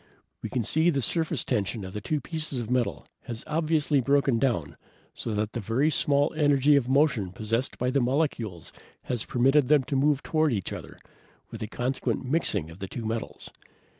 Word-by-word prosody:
We 110 - -4
can 125 0 -1
see 160 - +3
the 140 -5 +1
surface 165 +6 0
tension 105 -3 -1
of 95 - -8
the 105 - -4
two 150 +7 -1
pieces 155 -4 -3
of 120 0 -5
metal 125 -1 0 0.2
has 115 +1 -6
obviously 155 -2 +1
broken 140 -2 +2
down 85 - 0 0.4
so 110 - -4
that 105 +1 -1
the 120 +7 +1
small 145 0 +2
energy 145 -2 +4
of 130 -3 +1
motion 135 - +2
possessed 115 +6 -2
by 125 +1 0
the 140 0 +2
molecules 120 - -1 0.3
has 120 -3 -2
permitted 135 +3 +3
them 150 -1 +4
to 140 +2 -3
move 140 +1 +2
toward 155 -3 +1
each 100 -4 -2
other, - - -9 0.5
with - - -8
a 110 - -3
consequent 125 +3 -2
mixing 130 - 0
of 85 - -13
the 95 - -5
two 115 +4 -6
metals. 115 +1 -4
130 Hz, 185 wpm, -27 LUFS, 110-145 Hz, 0.5 s, energy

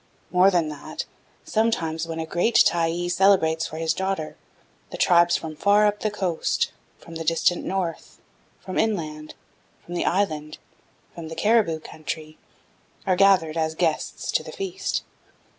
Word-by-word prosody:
More 185 +1 +6
than 175 -5 +1
that, 150 - -6 0.4
sometimes 165 -8 0
when 165 0 -5
a 160 - -2
great 175 +8 +3
Tyee 170 +1 +1
celebrates 175 -3 +3
for 155 - -8
his 160 0 0
daughter, 190 -4 -3 0.5
the - - -7
tribes 175 -1 +4
from 155 -1 -7
far 205 +5 +4
up 210 0 +1
the 215 - 0
coast, 190 -5 -1 0.3
from 165 - -13
the 165 0 -5
distant 165 +2 +1
north, 185 -4 -4 0.4
from 185 - -3
inland, 155 -8 -2 0.5
from 175 - -8
the 175 - -1
island, 155 -6 -1 0.6
from 170 -2 -8
the 165 - -7
Cariboo 200 -4 +2
country, 155 0 -7 0.7
are 185 -2 +2
gathered 180 -4 +4
as 160 0 0
guests 160 -2 -1
to - - +1
the - - -9
feast. 385 -1 -3
170 Hz, 150 wpm, -24 LUFS, 160-195 Hz, 0.7 s, More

